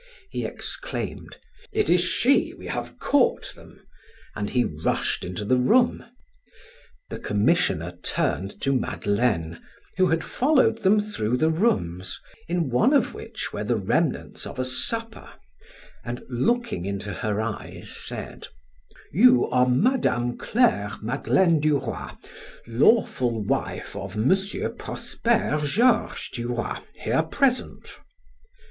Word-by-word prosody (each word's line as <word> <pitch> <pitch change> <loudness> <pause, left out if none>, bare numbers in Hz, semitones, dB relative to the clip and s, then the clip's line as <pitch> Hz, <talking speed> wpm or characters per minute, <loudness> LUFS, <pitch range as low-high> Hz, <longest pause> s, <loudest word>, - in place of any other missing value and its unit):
He - - -3
exclaimed: - - -5 0.3
"It 430 0 +1
is 175 - +4
she. 205 - +2
We - - -11
have - - -5
caught 285 -3 +1
them," - - -17 0.5
and 100 -1 -3
he 125 -1 +2
rushed 75 -5 -1
into 90 +3 -5
the 130 +4 +3
room. 240 - +3 1.1
The - - -5
commissioner 95 - +1
turned 95 +2 -1
to 135 - +1
Madeleine, 100 -9 -1 0.4
who 185 -1 +4
had 165 -1 +1
followed 260 -5 +2
them 205 +3 +4
through 125 - -1
the 160 +4 +2
rooms, 95 - -1 0.3
in 170 -5 -1
one 225 - +3
of 280 - +2
which - - -6
were - - -3
the - - 0
remnants - - -1
of - - -9
a 130 - -1
supper, 225 - -2 0.7
and 120 +1 -5
looking 130 - 0
into 100 +1 -4
her 105 -1 -2
eyes 110 -1 -4
said: - - -3 0.7
"You 250 - +6
are 125 0 +4
Mme. 125 - +2
Claire 210 - +2
Madeleine 165 +8 +2
du 150 -1 +3
Roy, - - -5 0.6
lawful 120 - +2
wife - - -2
of 95 +1 -6
M. 115 - +4 0.4
Prosper 225 -10 -1
Georges 230 - +2
du 120 0 -4
Roy, 120 -1 -2 0.2
here - - 0
present?" 265 -3 -1
130 Hz, 125 wpm, -25 LUFS, -, 1.1 s, You